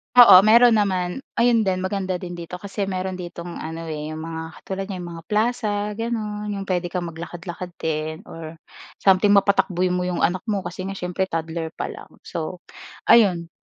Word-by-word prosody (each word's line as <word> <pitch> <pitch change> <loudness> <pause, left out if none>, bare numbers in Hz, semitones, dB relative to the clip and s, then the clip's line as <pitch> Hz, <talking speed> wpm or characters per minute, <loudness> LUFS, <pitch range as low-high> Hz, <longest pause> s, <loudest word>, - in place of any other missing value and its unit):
Oo, 230 -7 +11
meron 235 +2 +7
naman. 185 -1 0 0.2
Ayon 230 -3 +3
din 185 -1 0
maganda 190 -1 -1
din 175 -1 -6
dito 170 +1 -7
kasi 195 +1 -4
meron 185 -1 -3
ditong 175 -1 -7
ano, 160 +1 -6
eh, 155 0 -5
yung 160 - -6
mga 160 0 -6
katulad 195 0 -5
niyan 185 -3 -5
yung 175 - -7
mga 165 -1 -9
plaza 220 +1 +1 0.2
gano'n, 210 -1 -3
yung 195 - -4
pwede 180 -2 -1
kang 180 0 -3
maglakad-lakad 175 +2 -7
din 155 +2 -3
or 165 -5 -9 0.4
something 200 +1 +4
mapatakbo 195 -2 +3
mo 180 0 0
yung 180 -1 -1
anak 180 +2 +2
mo 205 -3 -1
kasi 185 +1 -5
nga 195 - -5
syempre 180 0 -2
toddler 165 -1 -3
pa - - -4
lang - - -11 0.2
so, 170 +2 -5 0.5
ayun. 180 -7 +5
185 Hz, 180 wpm, -23 LUFS, 170-200 Hz, 0.5 s, Oo